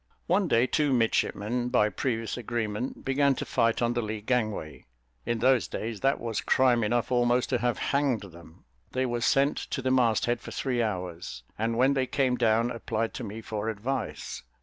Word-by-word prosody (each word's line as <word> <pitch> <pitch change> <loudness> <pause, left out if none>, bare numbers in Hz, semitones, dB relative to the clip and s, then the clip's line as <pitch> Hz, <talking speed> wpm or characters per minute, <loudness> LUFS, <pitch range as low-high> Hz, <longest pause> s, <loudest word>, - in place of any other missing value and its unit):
One 185 +2 +2
day 120 -4 +4
two 145 +1 +1
midshipmen, 120 0 0
by 105 -3 +3
previous 115 -1 -2
agreement, 115 0 -3
began 140 +1 +3
to - - -4
fight 115 +1 +1
on 120 0 +1
the 120 - 0
lee 110 -1 -4
gangway. 110 - -2 0.4
In 120 - +1
those 125 +1 +3
days, 110 -1 -4
that 135 +5 +1
was 115 -2 -2
crime 125 -3 +3
enough 120 +3 0
almost 120 0 +2
to - - +1
have 120 -1 0
hanged 140 -5 +1
them; 85 -4 -14 0.3
they 130 0 +1
were 120 -1 -2
sent 140 +4 +3
to - - -4
the 130 0 0
mast 120 -4 +3
head 120 0 0
for - - -9
three 125 -3 -1
hours, 90 -6 -4
and 115 +1 -1
when 130 +3 +4
they 130 -2 0
came 130 -2 +1
down 115 0 +2
applied 115 -1 -2
to 125 - -5
me 110 +1 -6
for 110 0 -3
advice. 115 +3 -4
120 Hz, 190 wpm, -28 LUFS, 110-130 Hz, 0.4 s, day